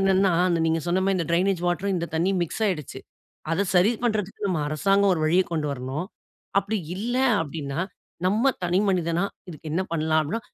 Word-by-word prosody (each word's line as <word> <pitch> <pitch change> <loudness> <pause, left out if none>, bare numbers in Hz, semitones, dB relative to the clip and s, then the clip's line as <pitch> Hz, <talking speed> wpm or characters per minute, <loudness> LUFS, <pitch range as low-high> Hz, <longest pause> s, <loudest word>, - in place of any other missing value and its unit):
என்னன்னா 195 -1 +3 0.3
நீங்க 160 0 +1
சொன்ன 180 +2 +1
மாதிரி 195 -1 +2
இந்த 165 - -1
ட்ரெயினேஜ் 180 +1 +2
வாட்டர் 185 +2 0
இந்த 170 0 -2
தண்ணீர் 180 +3 +1
மிக்ஸ் 195 +6 -3
ஆயிடுச்சு. 155 -8 -3 0.5
அதை 175 +5 +2
சரி 180 +5 +5
பண்றதுக்கு 210 -3 -1
நம்ம 170 -4 0
அரசாங்கம் 195 +6 +3
ஒரு 160 - -3
வழியைக் 180 +4 +2
கொண்டு 155 -2 -1
வரணும். 135 +6 -4 0.5
அப்படி 200 +2 -1 0.2
இல்ல 240 +5 -2 0.3
அப்படின்னா 145 0 -4 0.5
நம்ம 220 +8 +3
தனிமனிதனா 180 -1 +1 0.2
இதுக்கு 155 -1 -8
என்ன 185 +3 +1
பண்ணலாம் 160 -1 +2
அப்படின்னா, 155 +10 -2
180 Hz, 165 wpm, -25 LUFS, 160-195 Hz, 0.5 s, சரி